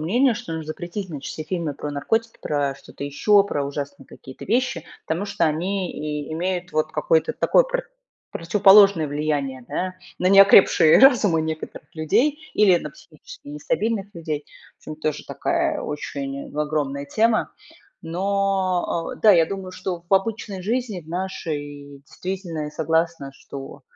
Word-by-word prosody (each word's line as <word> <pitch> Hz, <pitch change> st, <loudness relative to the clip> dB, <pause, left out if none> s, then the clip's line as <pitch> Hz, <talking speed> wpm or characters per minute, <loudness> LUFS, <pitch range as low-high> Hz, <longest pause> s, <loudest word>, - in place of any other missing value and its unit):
мнение, 235 Hz, -, +2 dB
что 165 Hz, -, -7 dB
нужно 160 Hz, -1 st, -5 dB
запретить 175 Hz, +5 st, -5 dB
значит 145 Hz, -4 st, -6 dB
все 155 Hz, -, -6 dB
фильмы 165 Hz, -3 st, -3 dB
про 150 Hz, -, -5 dB
наркотики, 225 Hz, +11 st, -1 dB
про 145 Hz, -2 st, -1 dB
что-то 140 Hz, -, -10 dB
еще, 195 Hz, +9 st, +3 dB
про 145 Hz, -8 st, -2 dB
ужасные 140 Hz, -1 st, -6 dB
какие-то 130 Hz, -, -12 dB
вещи. 235 Hz, -, 0 dB, 0.2 s
Потому 165 Hz, +5 st, -1 dB
что 200 Hz, -4 st, -1 dB
они 180 Hz, +4 st, -1 dB
и 150 Hz, 0 st, -5 dB
имеют 180 Hz, +2 st, -3 dB
вот 155 Hz, 0 st, 0 dB
какое-то 485 Hz, -1 st, +1 dB
такое -, -, +4 dB
про -, -, -3 dB, 0.5 s
противоположное 195 Hz, -1 st, +5 dB
влияние, 145 Hz, -3 st, -2 dB
да, 185 Hz, 0 st, -3 dB, 0.2 s
на 180 Hz, -, 0 dB
неокрепшие 195 Hz, -4 st, +7 dB
разумы 225 Hz, -, +5 dB
некоторых 160 Hz, 0 st, -6 dB
людей 255 Hz, -, +1 dB
или 195 Hz, -4 st, +5 dB
на -, -, -7 dB
психически -, -, -15 dB
нестабильных 230 Hz, -, -2 dB
людей. 155 Hz, -3 st, -4 dB, 0.3 s
В -, -, -15 dB
общем, 155 Hz, -, -6 dB
тоже 155 Hz, -1 st, -2 dB
такая -, -, -1 dB
очень 140 Hz, -2 st, -5 dB
огромная 145 Hz, -2 st, -1 dB
тема. 220 Hz, +8 st, +1 dB, 0.5 s
Но, 185 Hz, -1 st, -1 dB
э, -, -, -19 dB
да, 215 Hz, -, +8 dB
я 165 Hz, -2 st, +5 dB
думаю, 190 Hz, -2 st, -6 dB
что 185 Hz, -2 st, -5 dB
в -, -, -5 dB
обычной 195 Hz, -1 st, -1 dB
жизни, 225 Hz, -2 st, -2 dB
в 155 Hz, -, -20 dB
нашей, 145 Hz, -6 st, -5 dB
действительно, 180 Hz, -4 st, -5 dB
я 150 Hz, -, -6 dB
согласна, 160 Hz, -2 st, -1 dB
что 135 Hz, 0 st, -10 dB
170 Hz, 150 wpm, -23 LUFS, 150-200 Hz, 0.5 s, да